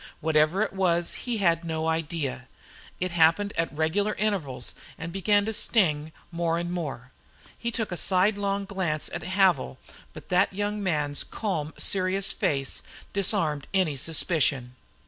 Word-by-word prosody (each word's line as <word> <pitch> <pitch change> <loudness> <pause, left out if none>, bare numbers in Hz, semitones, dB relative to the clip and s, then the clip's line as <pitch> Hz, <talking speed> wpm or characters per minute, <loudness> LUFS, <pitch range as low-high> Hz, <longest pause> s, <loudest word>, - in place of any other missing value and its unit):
Whatever 155 +5 +3
it - - -3
was 175 -3 +1
he 240 -2 -3
had 170 -4 +2
no 160 -1 -2
idea. 160 -5 -2 0.5
It 185 0 -1
came 170 +5 +4
at 165 0 0
regular 160 +8 0
intervals 150 - -2 0.2
and 165 +1 -5
began 205 +1 +3
to 220 - -1
sting 160 -9 +2 0.2
more 170 -1 0
and 175 0 -2
more. 145 -8 -4 0.4
He 235 - -3
took 225 -3 -3
a 175 - -2
sidelong 200 +2 +1
glance 185 -6 -2
at - - -3
Havil, 185 -6 +2 0.4
but 155 - -11
that 180 +2 +3
young 205 +1 -2
man's 150 -6 0
calm, 160 -8 -3
serious 190 0 +1
face 135 -2 0 0.3
disarmed 180 -7 0
any 180 -6 +2
suspicion. 140 -4 0
170 Hz, 145 wpm, -27 LUFS, 155-195 Hz, 0.5 s, came